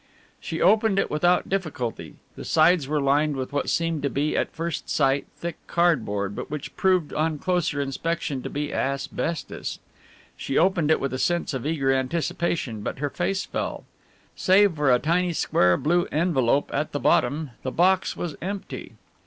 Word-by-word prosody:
She 165 Hz, -5 st, -5 dB
opened 215 Hz, +2 st, +4 dB
it -, -, +1 dB
without 175 Hz, +4 st, +2 dB
difficulty. 155 Hz, -11 st, -3 dB, 0.2 s
The -, -, -8 dB
sides 160 Hz, -2 st, +3 dB
were 150 Hz, +1 st, 0 dB
lined 145 Hz, +2 st, +2 dB
with 130 Hz, +1 st, -5 dB
what 145 Hz, -, -1 dB
seemed 165 Hz, -2 st, 0 dB
to 140 Hz, -, 0 dB
be 145 Hz, +3 st, -1 dB
at -, -, 0 dB
first 165 Hz, +1 st, -4 dB
sight 135 Hz, -1 st, +1 dB
thick 170 Hz, -1 st, -5 dB
cardboard 110 Hz, -, +1 dB
but -, -, -6 dB
which 150 Hz, -1 st, -6 dB
proved 185 Hz, -5 st, +2 dB
on 155 Hz, 0 st, 0 dB
closer 175 Hz, -3 st, 0 dB
inspection 140 Hz, 0 st, -2 dB
to -, -, -5 dB
be 145 Hz, +1 st, -3 dB
asbestos. 140 Hz, +4 st, -3 dB, 0.6 s
She 135 Hz, -, -3 dB
opened 170 Hz, -3 st, +3 dB
it 160 Hz, -, +4 dB
with 135 Hz, -2 st, -2 dB
a 130 Hz, -, -3 dB
sense 175 Hz, -1 st, 0 dB
of 130 Hz, +1 st, -3 dB
eager 135 Hz, -4 st, +1 dB
anticipation, 135 Hz, -3 st, -1 dB
but -, -, -4 dB
her 145 Hz, +1 st, -2 dB
face 190 Hz, +4 st, -1 dB
fell. -, -, -4 dB, 0.5 s
Save 195 Hz, 0 st, +4 dB
for 145 Hz, -3 st, +2 dB
a 125 Hz, -, +6 dB
tiny 175 Hz, +5 st, +1 dB
square 90 Hz, -, +3 dB
blue 175 Hz, +3 st, +1 dB
envelope 145 Hz, -5 st, +1 dB
at 150 Hz, +2 st, -2 dB
the 145 Hz, -, -1 dB
bottom, 145 Hz, +3 st, +1 dB
the 130 Hz, -, -3 dB
box 185 Hz, +4 st, +2 dB
was 170 Hz, -4 st, -4 dB
empty! 195 Hz, +3 st, -6 dB
155 Hz, 170 wpm, -25 LUFS, 140-175 Hz, 0.6 s, a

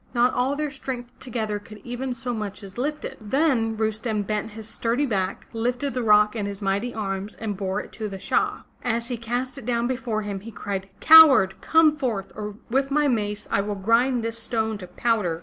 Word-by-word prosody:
Not 245 Hz, +1 st, +4 dB
all 255 Hz, +3 st, +1 dB
their 300 Hz, 0 st, -2 dB
strength 250 Hz, -3 st, -6 dB
together 220 Hz, -4 st, -3 dB
could 215 Hz, +1 st, -12 dB
even 245 Hz, +2 st, -4 dB
so 245 Hz, +1 st, -3 dB
much 210 Hz, -2 st, -5 dB
as 195 Hz, -1 st, -10 dB
lift 295 Hz, +3 st, -2 dB
it. -, -, -7 dB
Then 230 Hz, -2 st, +1 dB
Rustem 220 Hz, 0 st, -1 dB
bent 215 Hz, +1 st, -2 dB
his 220 Hz, 0 st, -8 dB
sturdy 235 Hz, +5 st, 0 dB
back, 195 Hz, -6 st, -2 dB
lifted 245 Hz, +4 st, -1 dB
the 255 Hz, -, -1 dB
rock 210 Hz, -1 st, +5 dB
in 205 Hz, -3 st, -2 dB
his 200 Hz, -1 st, -5 dB
mighty 200 Hz, +4 st, -1 dB
arms 195 Hz, -2 st, -4 dB
and 215 Hz, -2 st, -4 dB
bore 195 Hz, +1 st, -2 dB
it -, -, -12 dB
to 215 Hz, -2 st, -5 dB
the 195 Hz, -, -6 dB
Shah. -, -, 0 dB, 0.2 s
As 235 Hz, 0 st, -1 dB
he 245 Hz, -, -1 dB
cast 245 Hz, +4 st, -3 dB
it 250 Hz, -, -11 dB
down 235 Hz, -1 st, +1 dB
before 235 Hz, -3 st, -2 dB
him, 200 Hz, -1 st, -4 dB
he 215 Hz, +4 st, -9 dB
cried: 200 Hz, -3 st, -5 dB
Coward, 280 Hz, -12 st, +9 dB
come 320 Hz, -2 st, +5 dB
forth 235 Hz, -10 st, -2 dB
or 210 Hz, -1 st, -5 dB
with 270 Hz, +3 st, +1 dB
my 295 Hz, +1 st, +2 dB
mace 210 Hz, -4 st, -1 dB
I -, -, +3 dB
will 205 Hz, +1 st, -3 dB
grind 230 Hz, +5 st, +2 dB
this 230 Hz, 0 st, -1 dB
stone 220 Hz, -2 st, -1 dB
to 180 Hz, -, -8 dB
powder!" 180 Hz, -4 st, 0 dB
225 Hz, 210 wpm, -24 LUFS, 210-250 Hz, 0.2 s, Coward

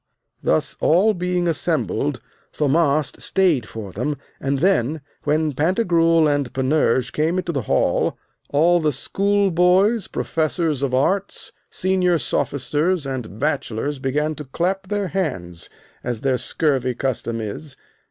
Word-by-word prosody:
Thus -, -, +1 dB
all 195 Hz, +7 st, +4 dB
being 180 Hz, -1 st, -1 dB
assembled, 160 Hz, -, -1 dB, 0.3 s
Thaumast 150 Hz, 0 st, +1 dB
stayed 165 Hz, -, +2 dB
for 105 Hz, -4 st, -7 dB
them, 130 Hz, +9 st, -2 dB, 0.2 s
and 140 Hz, 0 st, 0 dB
then, 155 Hz, -3 st, +1 dB, 0.2 s
when 150 Hz, 0 st, +1 dB
Pantagruel 165 Hz, -, +3 dB
and 145 Hz, -3 st, 0 dB
Panurge 130 Hz, -2 st, +1 dB
came 160 Hz, +4 st, +1 dB
into 175 Hz, -2 st, -1 dB
the 140 Hz, -5 st, -1 dB
hall, -, -, +1 dB, 0.3 s
all 170 Hz, +5 st, +4 dB
the 155 Hz, -2 st, +1 dB
schoolboys, 195 Hz, -, +2 dB
professors 160 Hz, -2 st, -1 dB
of 135 Hz, -2 st, 0 dB
arts, 195 Hz, +9 st, 0 dB, 0.2 s
senior 185 Hz, -2 st, +1 dB
sophisters, 150 Hz, +5 st, 0 dB
and 125 Hz, -6 st, -5 dB
bachelors 145 Hz, -2 st, -1 dB
began 150 Hz, +4 st, 0 dB
to 150 Hz, -1 st, -8 dB
clap 185 Hz, +8 st, -2 dB
their 205 Hz, -1 st, -1 dB
hands, 90 Hz, -, -3 dB, 0.3 s
as 120 Hz, -2 st, -3 dB
their 130 Hz, -2 st, +1 dB
scurvy 130 Hz, -5 st, 0 dB
custom 120 Hz, -3 st, -2 dB
is. 115 Hz, +7 st, -6 dB
155 Hz, 125 wpm, -21 LUFS, 130-180 Hz, 0.3 s, all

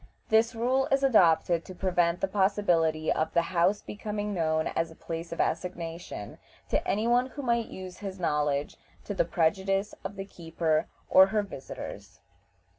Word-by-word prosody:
This 225 Hz, +2 st, +3 dB
rule 255 Hz, +4 st, +1 dB
is 275 Hz, 0 st, +3 dB
adopted 175 Hz, -8 st, +4 dB
to 185 Hz, -, -10 dB
prevent 175 Hz, -2 st, +1 dB
the -, -, +2 dB
possibility 180 Hz, -6 st, +2 dB
of 155 Hz, -, -1 dB
the 170 Hz, -, +4 dB
house 185 Hz, +4 st, +2 dB
becoming 210 Hz, -1 st, -4 dB
known 160 Hz, -3 st, +1 dB
as 165 Hz, 0 st, -1 dB
a 160 Hz, -, -13 dB
place 165 Hz, +1 st, -6 dB
of 170 Hz, -, -6 dB
assignation 165 Hz, -, -3 dB, 0.3 s
to -, -, 0 dB
any 215 Hz, +3 st, +1 dB
one 245 Hz, +2 st, +3 dB
who 285 Hz, +2 st, -8 dB
might 235 Hz, -2 st, +1 dB
use 185 Hz, -1 st, -9 dB
his 195 Hz, -2 st, -6 dB
knowledge 150 Hz, -4 st, 0 dB, 0.3 s
to 205 Hz, -, -3 dB
the 190 Hz, -, +1 dB
prejudice 195 Hz, +4 st, 0 dB
of 200 Hz, -, -5 dB
the 195 Hz, -1 st, -5 dB
keeper 165 Hz, -4 st, -1 dB, 0.2 s
or 190 Hz, 0 st, +7 dB
her 210 Hz, +1 st, 0 dB
visitors. 140 Hz, -9 st, -9 dB
185 Hz, 165 wpm, -28 LUFS, 165-210 Hz, 0.3 s, or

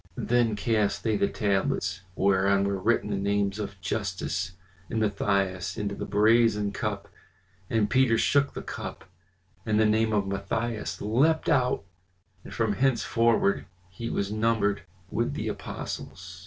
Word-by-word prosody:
Then 120 Hz, -2 st, +2 dB
cast 105 Hz, -1 st, 0 dB
they 110 Hz, -2 st, +1 dB
the 100 Hz, -, +2 dB
tablets, 95 Hz, -1 st, -1 dB
whereon 100 Hz, 0 st, +3 dB
were 100 Hz, -1 st, -1 dB
written 105 Hz, 0 st, +1 dB
the 100 Hz, -, 0 dB
names 100 Hz, +1 st, 0 dB
of 100 Hz, -2 st, -5 dB
Justus 95 Hz, -1 st, -2 dB, 0.4 s
and 115 Hz, -, -1 dB
Matthias, 100 Hz, -3 st, 0 dB
into 105 Hz, -2 st, -2 dB
the -, -, -5 dB
brazen 105 Hz, 0 st, +3 dB
cup; 100 Hz, -, -3 dB, 0.6 s
and 110 Hz, -2 st, +2 dB
Peter 130 Hz, -2 st, +3 dB
shook 140 Hz, +4 st, +2 dB
the -, -, -5 dB
cup, -, -, -7 dB, 0.6 s
and 110 Hz, -1 st, +1 dB
the 110 Hz, -, +5 dB
name 110 Hz, +1 st, +2 dB
of 105 Hz, -2 st, +1 dB
Matthias 110 Hz, +4 st, -3 dB
leapt 135 Hz, +10 st, +2 dB
out, 125 Hz, -4 st, +2 dB, 0.6 s
and -, -, -11 dB
from 110 Hz, -3 st, 0 dB
henceforward 115 Hz, -3 st, +2 dB, 0.2 s
he 115 Hz, +5 st, -5 dB
was 100 Hz, 0 st, -2 dB
numbered 110 Hz, -2 st, +1 dB, 0.3 s
with -, -, -1 dB
the -, -, -3 dB
apostles. 90 Hz, 0 st, -6 dB
105 Hz, 140 wpm, -27 LUFS, 100-115 Hz, 0.6 s, the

